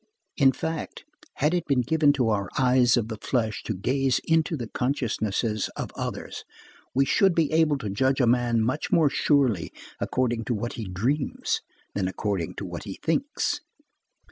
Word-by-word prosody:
In 135 -3 +5
fact, 160 +5 -5 0.3
had 150 +4 +1
it 175 -2 -1
been 135 -3 +3
given 150 +2 +4
to 125 -5 +1
our 100 -3 0
eyes 125 -1 +4
of 115 -2 0
the 110 -2 -6
flesh 110 -5 -1
to 110 - -2
gaze 130 +7 +1
into 160 0 +1
the 120 -4 -5
consciences 115 -5 -1
of - - -5
others, - - -5 0.5
we 135 +1 +4
should 190 +4 +3
be 160 -3 +2
able 155 -2 +3
to 105 - -5
judge 130 +7 +1
a 125 - +4
man 120 -1 +2
much 130 +6 -2
more 155 -4 +4
surely 130 - +2 0.3
according 120 -3 -1
to 120 - 0
what 120 +3 -3
he 115 - -5
dreams, 120 +11 -1 0.3
than 95 -2 -1
according 95 -2 -2
to 100 - -5
what 90 +1 -6
he 100 - -6
thinks. 275 - 0
125 Hz, 170 wpm, -26 LUFS, 110-145 Hz, 0.5 s, In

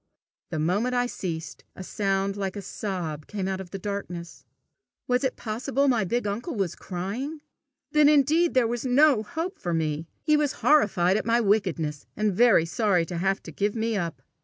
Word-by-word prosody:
The 160 - -3
moment 200 +11 +1
I 245 0 +2
ceased, 160 - -5
a 190 - -7
sound 195 0 -1
like 195 -1 -3
a 205 - -4
sob 175 -7 -4
came 195 -3 -3
out 190 0 -2
of 185 - -10
the 195 - -5
darkness. 180 -4 -6 0.6
Was 250 +1 +1
it 260 - 0
possible 260 +5 -1
my 235 -7 +2
big 240 +5 -1
uncle 225 - -3
was 190 -5 -1
crying? 230 - -5 0.5
Then 300 -1 +6
indeed 305 +3 +3
there 255 -2 +5
was 235 0 -2
no 265 -1 +4
hope 330 - -5
for 175 -2 -2
me! 155 0 -1 0.2
He 305 -1 +4
was 295 -2 +1
horrified 200 -10 +4
at - - -3
my 230 +1 +4
wickedness, 180 -9 0
and 210 -1 +1
very 220 -5 +5
sorry 180 -1 +1
to 170 0 -4
have 195 +2 0
to - - -9
give 205 +2 -1
me 225 0 -1
up! 165 -8 -3
205 Hz, 185 wpm, -26 LUFS, 180-245 Hz, 0.6 s, Then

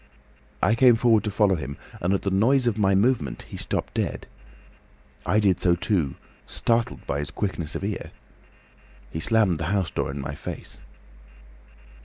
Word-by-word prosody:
"I 105 - +4
came 120 0 +6
forward 115 -2 +3
to - - 0
follow 100 -1 +3
him, 70 -5 -4 0.2
and 90 - +1
at 100 - 0
the 100 - 0
noise 125 +7 +3
of 115 -3 +1
my 95 -1 +3
movement 100 - +1
he - - -11
stopped - - -3
dead. - - -2 1.0
I 105 +5 +3
did 95 -4 +3
so 85 -1 +3
too, 85 - 0 0.3
startled 115 - 0
by 70 - -2
his 75 - -3
quickness 90 -6 -3
of - - -4
ear. 100 0 -3 1.0
He 80 - -4
slammed 100 -3 +2
the 85 - -2
house 95 0 0
door - - -2
in 70 +1 -5
my 70 0 -4
face. - - -7
95 Hz, 170 wpm, -25 LUFS, 85-110 Hz, 1.0 s, came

